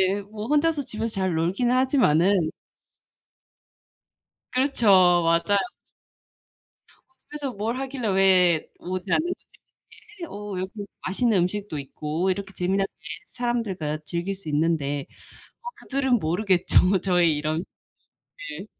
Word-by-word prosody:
네. 205 - -3
뭐 210 +2 -8
혼자서 300 +1 +2
집에서 225 -2 -4
잘 190 -3 0
놀기는 190 +10 +1
하지만은 200 - +3 2.0
그렇죠. 255 -3 +1 0.4
맞아요. 170 +5 +2 1.5
"어 350 - -38
집에서 295 -3 -6
뭘 225 +3 -3
하길래 265 -3 -3
왜 185 -4 +4
오지 185 +1 -5
않는 345 - +2
거지? - - -26 0.7
이렇게 340 - -7
어 205 -1 -6
이렇게 185 +1 -3 0.3
맛있는 210 +2 +2
음식도 180 -2 -2
있고 150 +6 -3
이렇게 195 +1 -5
재미나게 195 +2 0 0.4
사람들과 210 -11 -2
즐길 175 +5 -3
수 190 -5 -8
있는데." 145 -2 0 0.6
뭐 485 - -5
그들은 265 -3 0
모르겠죠 185 +1 +3
저의 175 -5 +3
이런 155 +2 -1
스 180 - -8 0.9
을. - - -8
195 Hz, 265 characters per minute, -25 LUFS, 170-240 Hz, 2.0 s, 왜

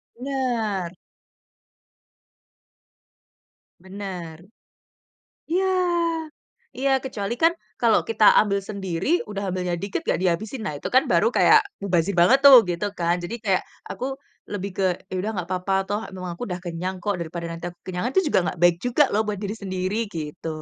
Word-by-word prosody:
Bener. 235 -8 -2 2.9
Bener. 185 -3 -7 1.1
Iya. 370 +3 +1 1.1
Iya 275 +1 +1
kecuali 225 -4 -3
kan 330 +1 +5 0.3
kalau 230 -2 +4
kita 220 -1 0 0.2
ambil 200 -2 0
sendiri, 190 -4 -4 0.2
udah 200 -2 -3
ambilnya 180 -1 -2
dikit 200 +10 -3
nggak - - 0
dihabisin, 205 +7 -1
nah 150 - -2
itu - - -5
kan 260 - +7
baru - - +4
kayak - - +6 0.2
mubazir 185 -1 +1
banget 235 +11 +6
tuh 275 -2 +11
gitu 175 +3 -1
kan. 170 +1 +2
Jadi 215 +7 -4
kayak 190 -3 +1 0.3
aku 200 +7 -4 0.5
lebih 200 -1 -3
ke 195 - 0 0.3
ya 185 - -5
udah 215 +2 -2
nggak 180 -2 -3
apa-apa, 185 +1 -1
toh 205 +1 -1
emang 185 -1 -7
aku - - -13
udah 180 -2 -4
kenyang 180 +2 -4
kok 205 -2 0
daripada 170 0 -5
nanti 165 0 -8
aku 175 - -25
kekenyangan 185 +7 -3
itu 380 - +4
juga - - +4
nggak 180 - -3
baik 175 -1 +6
juga 250 +5 +4
loh 215 - +2
buat 205 -2 -2
diri 210 +1 -3
sendiri 190 0 -3 0.2
gitu. 155 0 -6
195 Hz, 155 wpm, -24 LUFS, 175-220 Hz, 2.9 s, tuh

